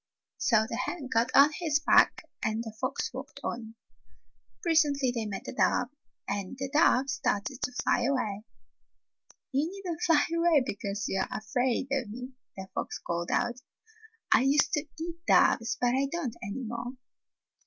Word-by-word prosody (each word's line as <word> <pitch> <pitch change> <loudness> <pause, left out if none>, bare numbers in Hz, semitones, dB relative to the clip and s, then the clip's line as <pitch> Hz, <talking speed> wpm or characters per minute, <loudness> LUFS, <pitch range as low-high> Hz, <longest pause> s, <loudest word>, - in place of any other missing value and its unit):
So 220 -3 +3
the 230 - -4
hen 295 -7 -5
got 230 +2 +3
on 285 +2 +8
his 315 -4 +2
back - - +4 0.2
and 220 +1 -1
the 220 -2 -7
fox - - -2
walked - - -8
on. 225 -1 -5 0.9
Presently 295 -6 +3
they 225 -3 -2
met 200 -2 -6
a - - -5
dove, 250 -1 +2 0.4
and 200 +4 -3
the 270 0 -4
dove 275 -4 +4
started 250 0 -1
to - - -1
fly 245 -1 +1
away. 220 -7 -1 1.1
"You 285 +4 +1
need 395 +1 -9
n't 335 -3 -4
fly 325 -4 +4
away 335 -4 +4
because 205 -2 -3
you 195 - -1
are - - -1
afraid 245 +4 -1
of 265 -5 -1
me," 250 +4 -7 0.3
the 190 0 -6
fox - - -3
called 170 0 -3
out. 240 0 0 0.7
"I - - +6
used 280 +5 +3
to 300 -2 0
eat 335 +1 -6
doves, 230 +2 +4
but 245 0 +2
I 270 +2 +1
don't 285 -9 -3
any 210 +7 -5
more." 240 +2 -5
250 Hz, 165 wpm, -29 LUFS, 220-290 Hz, 1.1 s, on